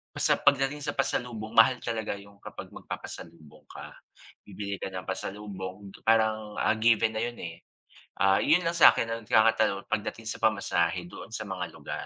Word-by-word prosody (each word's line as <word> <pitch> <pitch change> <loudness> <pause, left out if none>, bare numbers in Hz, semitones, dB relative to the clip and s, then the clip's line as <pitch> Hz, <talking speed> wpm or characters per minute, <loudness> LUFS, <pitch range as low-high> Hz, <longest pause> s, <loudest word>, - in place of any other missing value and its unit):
Basta - - +2
pagdating 140 +1 +2
sa 145 - -4
pasalubong, 120 -5 -2
mahal 115 +3 +6
talaga 110 -3 -2
yung 100 0 -14
kapag - - -10
magpapasalubong 75 -3 -9
ka. - - -11 0.5
Bibili 100 0 -5
ka - - -4
ng 95 -1 -6
pasalubong 95 0 -6 0.2
parang, 110 -1 +2
ah, - - +2
given 110 0 +3
na 110 - -3
'yon, 120 +1 -2
eh. 85 0 -8 0.5
Ah,'yon 120 - +3
lang 170 0 -1
sa 165 - +9
akin 115 - -2
ang 115 -1 -4
nagkakatalo 110 -2 +3
pagdating 110 +1 -3
sa - - -3
pamasahe 90 -4 0
doon 115 - -11
sa 110 - -3
mga 90 -2 -4
lugar. - - -6
110 Hz, 165 wpm, -28 LUFS, 95-115 Hz, 0.5 s, sa